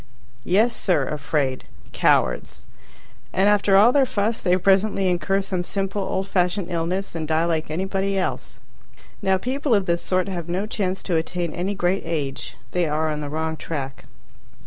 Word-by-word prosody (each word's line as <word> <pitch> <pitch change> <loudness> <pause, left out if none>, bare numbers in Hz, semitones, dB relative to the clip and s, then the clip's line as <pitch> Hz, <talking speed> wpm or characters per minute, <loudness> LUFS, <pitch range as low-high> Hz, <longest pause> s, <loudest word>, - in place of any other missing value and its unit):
Yes, 220 +6 +3
sir, 150 -9 +1
afraid. 145 -3 -1 0.3
"Cowards." - - +1 0.7
And 190 +2 +2
after 205 -1 +4
all 215 +5 +7
their 270 -1 +3
fuss 215 +1 -1
they 180 0 +3
presently 195 +1 +2
incur 180 +2 +1
some 185 -2 -2
simple 195 +2 -2
old 190 0 -2
fashioned 180 0 0
illness 175 +4 -2
and 160 -2 -4
die 160 +1 +2
like 160 -2 -1
anybody 195 +4 -1
else. 185 - -3 0.6
Now 190 0 +2
people 260 +4 0
of 200 -2 +1
this 170 -1 0
sort 185 0 0
have 175 -3 -4
no 185 +4 -1
chance 195 -4 -2
to 175 -4 0
attain 170 +1 -2
any 190 +3 -2
great 185 +1 +1
age. 150 -5 -3 0.2
They 180 -2 +1
are 155 +1 0
on 150 0 -3
the 145 - -4
wrong 160 +1 -2
track. 140 -5 -5
180 Hz, 170 wpm, -23 LUFS, 160-195 Hz, 0.7 s, all